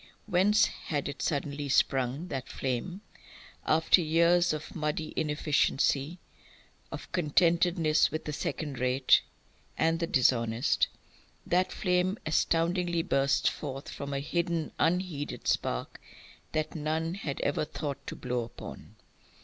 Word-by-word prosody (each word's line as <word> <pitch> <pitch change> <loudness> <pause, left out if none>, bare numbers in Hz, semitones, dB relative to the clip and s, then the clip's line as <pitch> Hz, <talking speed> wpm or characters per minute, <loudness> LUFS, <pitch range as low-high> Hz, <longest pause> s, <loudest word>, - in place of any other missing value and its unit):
Whence 200 +5 +4
had 145 -3 -4
it 140 -1 -6
suddenly 145 -1 -2
sprung, 135 +4 +1
that 135 -3 -4
flame? 135 +9 -3 0.7
After 160 +3 +4
years 170 +2 +3
of 155 0 -5
muddy 155 0 -2
inefficiency, 150 0 +1 0.7
of - - -8
contentedness 170 -1 +3
with 155 - -5
the 150 - -3
second 145 -2 -4
rate 130 +1 +4 0.6
and 165 +1 +2
the 170 - -1
dishonest, 120 -2 +2 0.6
that 180 +1 +1
flame 180 +1 +1
astoundingly 170 +2 +1
bursts 140 -1 +2
forth, 135 -2 -4
from 140 0 -6
a 140 - -1
hidden, 170 +1 -1
unheeded 165 -4 -1
spark - - -1 0.5
that 155 0 -2
none 160 +1 -2
had 155 -7 -4
ever 145 +2 0
thought 145 -1 -5
to - - -5
blow 125 -1 -2
upon. - - -11
155 Hz, 120 wpm, -29 LUFS, 140-170 Hz, 0.7 s, Whence